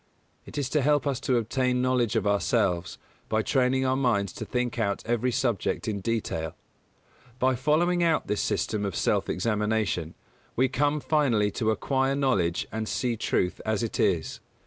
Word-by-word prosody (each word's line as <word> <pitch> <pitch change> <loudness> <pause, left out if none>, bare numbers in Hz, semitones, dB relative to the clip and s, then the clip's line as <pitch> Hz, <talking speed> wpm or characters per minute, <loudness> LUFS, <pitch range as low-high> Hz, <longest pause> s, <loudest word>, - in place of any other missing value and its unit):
It - - -9
is 140 -3 0
to 150 +2 +1
help 145 0 +2
us 140 -3 0
to 130 -3 +1
obtain 125 +2 0
knowledge 125 -3 +1
of - - +1
ourselves, 100 -3 +1 0.3
by 110 0 +1
training 130 +1 +2
our 130 0 +2
minds 115 -8 +1
to - - -6
think 125 -1 -2
out 100 -3 -1
every 120 +2 0
subject 120 -5 -1
in 105 -2 -1
detail. 95 -7 -2 0.8
By 130 0 +2
following 155 +7 +2
out 165 -2 +2
this 105 - -1
system 105 -2 -1
of 100 -3 -3
self - - +1
examination, 105 -6 -1 0.4
we 130 +1 +2
come 145 +3 +1
finally 120 -11 +2
to 110 +1 -1
acquire 135 +4 +1
knowledge 100 -12 +1
and 110 0 -3
see 125 -2 -1
truth 90 -4 -1
as 110 0 -1
it 115 - -3
is. - - +1
120 Hz, 170 wpm, -27 LUFS, 105-130 Hz, 0.8 s, help